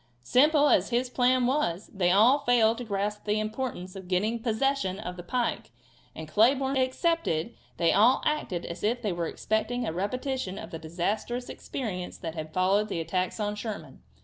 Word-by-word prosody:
Simple 295 - +4
as 195 -8 +3
his 245 +1 0
plan 250 0 +3
was, 240 - -1
they 185 -3 +2
all 225 +10 +5
failed 235 -4 +3
to - - -4
grasp 210 -1 -3
the 210 0 +1
importance 215 -4 -4
of 190 -2 -9
getting 210 +6 0
possession 230 -3 0
of 180 -4 -6
the 180 - -7
pike 240 +7 -2 0.5
and, 160 0 -7
Cleburne 265 - +3
excepted, 260 - 0 0.2
they 170 -1 +3
all 235 +6 +4
acted 250 - -1
as 170 - -7
if 240 +3 0
they 210 - 0
were 170 -1 -2
expecting 235 +6 -1
a 160 - -2
repetition 230 +2 -3
of - - -8
the 165 - -6
disastrous 205 +9 -3
experience 185 -9 -5
that 165 -3 -5
had 155 -1 -6
followed 195 +5 +2
the 170 - -2
attacks 180 +5 -2
on 210 -1 -1
Sherman. 210 0 -7
215 Hz, 175 wpm, -28 LUFS, 185-250 Hz, 0.5 s, all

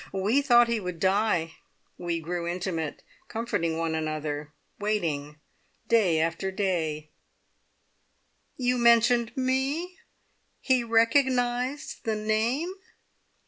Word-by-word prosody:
We 205 +8 +2
thought 240 -4 +5
he 235 -1 0
would 180 -4 -5
die. 190 -4 +1 0.4
We 170 -1 -3
grew 170 +1 -3
intimate, 175 -3 -3 0.2
comforting 220 -8 -2
one 165 -1 -1
another, 155 -1 -3 0.3
waiting 155 -9 -2 0.5
day 195 -9 +3
after 165 +4 -1
day 165 -6 -2 0.8
" - - -44
"You 250 0 +2
mentioned 235 0 +4
me? 270 +8 -1 0.6
He 255 -2 +2
recognised 245 +3 +1
the 220 -1 -1
name?" 225 - 0
210 Hz, 100 wpm, -27 LUFS, 165-240 Hz, 0.8 s, thought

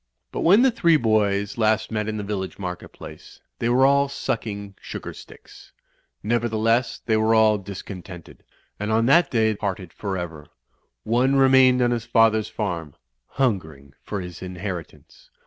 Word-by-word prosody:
But - - -5
when 200 +8 +5
the 265 - +4
three 170 -8 +3
boys 105 -3 0
last 110 0 +1
met 105 -1 -2
in 110 - -3
the 105 - -4
village 100 -2 -4
market 90 -2 -6
place, - - -13 0.2
they 115 - 0
were 130 +2 +4
all 140 0 +3
sucking 110 -7 -4
sugar - - -7
sticks. - - -15 0.5
Nevertheless, 115 +1 0
they 110 - +2
were 110 +1 +3
all 110 -1 +4
discontented, 95 -2 -10 0.4
and 105 +1 -2
on 115 +1 +2
that 165 +8 +4
day 110 -2 +2
parted 95 -4 -5
for 100 -2 -4
ever. 80 -4 -7 0.6
One 125 +4 +2
remained 130 -2 +5
on 120 - +2
his 120 -1 -2
father's 110 -2 +3
farm, 85 -8 -4 0.4
hungering 80 - -2
for 100 -2 -5
his 90 -1 -9
inheritance. 90 -5 -8
110 Hz, 155 wpm, -23 LUFS, 95-120 Hz, 0.6 s, when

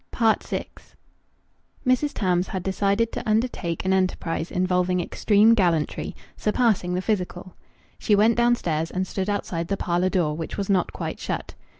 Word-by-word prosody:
VI 225 -2 +1 1.2
Mrs. 255 +3 +2
Tams 180 -2 +1
had 185 -2 -4
decided 200 +4 +1
to - - -4
undertake 215 -7 -1
an 190 - +2
enterprise 180 -3 -1
involving 180 0 +1
extreme 210 +5 +3
gallantry 170 -8 0 0.2
surpassing 210 -5 +1
the 185 - -2
physical. 185 -3 -3 0.4
She 210 - +3
went 220 +3 +4
downstairs 180 -10 +1
and 185 +1 -2
stood 190 +1 -3
outside 170 -5 -2
the 200 - -1
parlour 175 +1 0
door, 170 -6 0
which 165 0 -5
was 200 0 -1
not 185 -2 +1
quite - - -5
shut. - - -4
190 Hz, 150 wpm, -24 LUFS, 180-215 Hz, 1.2 s, went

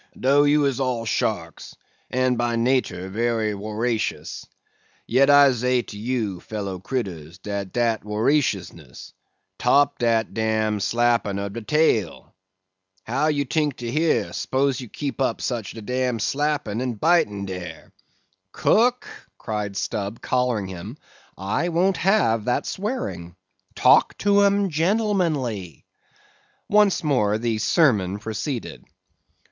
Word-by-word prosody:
"Do 140 +3 +4
you 145 0 +3
is 135 -1 0
all 125 -3 -1
sharks, - - -3 0.3
and 130 0 +1
by 120 0 0
natur 115 -7 0
wery 115 0 0
woracious, 110 +3 -3 0.6
yet 135 +4 +3
I 145 -1 +7
zay 125 0 0
to 105 - -10
you, 110 -5 -2
fellow 100 -1 -5
critters, 90 - -5
dat 100 -1 -5
dat 115 -2 0
woraciousness—'top 105 - -1
dat 115 -2 +1
dam 110 -1 0
slappin' 115 -2 +1
ob 100 0 -4
de 115 - -5
tail! 110 - 0 0.7
How 135 +7 0
you 145 -2 0
tink 150 0 0
to 120 -1 -5
hear, 160 +3 +1
spose 135 0 0
you 125 - -9
keep 140 +2 -5
up 130 - 0
such 115 -6 -4
a 110 - -8
dam 125 +1 -1
slappin' 135 -2 -1
and 125 -4 -3
bitin' 105 -12 +2
dare?" 90 -2 -8 0.6
"Cook," 245 +3 +2 0.3
cried 105 -3 -4
Stubb, 100 +2 -3
collaring 125 -5 0
him, 90 -2 -8 0.4
"I 105 - -1
won't 180 +3 +1
have 115 - +2
that 125 - 0
swearing. 195 - -4 0.4
Talk - - +4
to 205 0 +3
'em 200 -1 +2
gentlemanly." 160 - -1 0.8
Once 205 -3 +3
more 110 -9 +2
the 115 -1 -1
sermon 105 - +2
proceeded. 110 +5 -5
120 Hz, 125 wpm, -23 LUFS, 105-145 Hz, 0.8 s, I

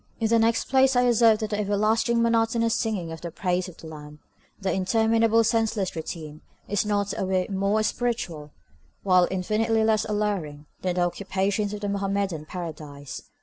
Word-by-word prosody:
In 225 -2 +1
the 230 0 +4
next 230 0 +2
place 265 0 +4
I 245 - +4
assert 230 -2 +4
that 215 0 -3
the 210 - -1
everlasting 220 +3 +1
monotonous 230 0 +2
singing 195 -7 -2
of 165 - -8
the 170 - -5
praises 180 +1 -1
of 175 - -14
the - - -11
lamb, 150 -1 -10 0.4
the 195 -2 -1
interminable 225 +3 +3
senseless 225 -4 0
routine, 155 -2 -7 0.3
is 205 -1 0
not 205 -1 0
a - - -2
whit 185 0 0
more 200 +3 +1
spiritual, 215 -11 -2 0.5
while 185 -2 +4
infinitely 220 +4 0
less 220 -1 +2
alluring, 200 -9 -2 0.2
than 180 -1 -1
the 180 - +1
occupations 195 +3 -1
of 210 0 -6
the 205 - -2
Mohammedan 195 -5 -2
Paradise. 150 -6 -7
205 Hz, 170 wpm, -25 LUFS, 180-225 Hz, 0.5 s, the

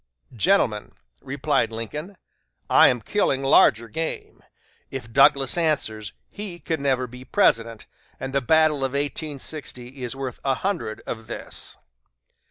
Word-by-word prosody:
"Gentlemen," 115 - +1 0.3
replied 140 -1 0
Lincoln, 150 - -6 0.5
"I - - +8
am 125 -2 +1
killing 135 - 0
larger 115 -4 +5
game; 160 +9 -5 0.5
if 120 -4 -7
Douglas 135 +2 +5
answers, 110 -10 -1 0.2
he 200 -4 -7
can 160 -4 -3
never 130 -2 +1
be 125 +1 -11
President, 115 -3 +1 0.3
and 135 0 -5
the 140 - +2
battle 155 +3 +4
of 135 -1 -2
1860 140 -2 -4
is 125 +1 -4
worth 135 -3 -5
a 135 -1 +1
hundred 175 - -3
of 110 -1 -6
this." - - -6
135 Hz, 130 wpm, -24 LUFS, 120-155 Hz, 0.5 s, I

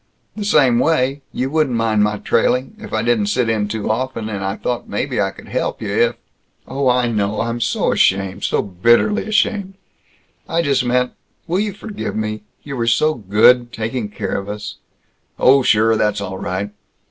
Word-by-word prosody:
" - - -45
the 215 - -4
same 135 -11 +4
way, 140 -2 +1
you 130 +2 -2
wouldn't 155 -5 +1
mind 110 -2 +1
my 105 0 0
trailing, 125 +5 0
if - - -10
I 110 0 0
didn't 115 -3 +1
sit 120 +2 +1
in 105 -2 0
too 110 0 -2
often; 115 -1 -3
and 100 -2 -4
I 95 +1 -2
thought 120 +1 -4
maybe - - -1
I - - +1
could - - -13
help - - -2
you - - -4
if - - +2 0.3
" - - -42
"Oh, 135 0 0
I 125 0 +2
know! 105 -1 0
I'm 115 +1 -2
so - - +1
ashamed! 95 -1 +1
So - - +1
bitterly 120 - +2
ashamed! 200 -2 0 0.7
I 170 +1 +1
just 140 -4 +2
meant 125 0 +1 0.3
Will 175 +3 0
you 210 0 0
forgive 210 +1 -6
me? 110 -1 -3 0.2
You 140 -2 -6
were 115 -1 -1
so 155 +7 +3
good, 120 +3 +3
taking 115 -1 -3
care 105 - -3
of 100 +1 -8
us 105 0 -6 0.3
" - - -42
"Oh, 135 +2 +6
sure, 110 -2 +3
that's 105 -1 +1
all 95 -1 -5
right!" 100 +3 -3
120 Hz, 195 wpm, -19 LUFS, 105-135 Hz, 0.7 s, Oh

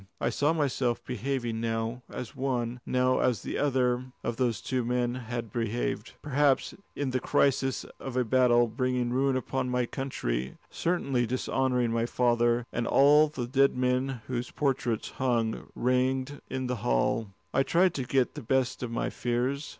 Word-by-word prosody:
I - - 0
saw 145 +2 +2
myself 135 -6 0
behaving 120 -2 -2
now 115 +1 -2
as 125 - -6
one, 125 -2 -2
now 130 0 +2
as 125 -4 +1
the - - -3
other, 130 -3 +1 0.2
of 120 -1 -2
those 120 -6 +1
two 130 +5 -1
men 120 0 0
had 120 -3 -5
behaved, 115 0 -2
perhaps 145 -1 +2 0.2
in 140 -2 -1
the 130 - +1
crisis 135 0 +1 0.2
of 130 -2 -5
a 125 - +2
battle 120 0 +4
bringing 125 +1 -1
ruin 135 +1 +2
upon 130 0 -2
my 125 0 +1
country, 65 - -3
certainly 140 -8 0
dishonouring 125 -1 0
my 115 0 0
father 120 -1 +2
and 120 -1 -1
all 150 +3 +6
the 140 -5 -4
dead 135 +1 +3
men 125 0 0
whose 125 -1 -3
portraits 130 -6 -1
hung 120 -4 -1
ranged 130 +2 0
in 130 0 -3
the 125 -1 -2
hall. 60 - +1 0.3
I - - +4
tried 175 +5 +3
to 135 - -2
get 130 0 +1
the 150 - -7
best 130 +1 0
of 125 - -3
my 115 - -2
fears. 125 +4 -1
125 Hz, 165 wpm, -28 LUFS, 120-135 Hz, 0.3 s, all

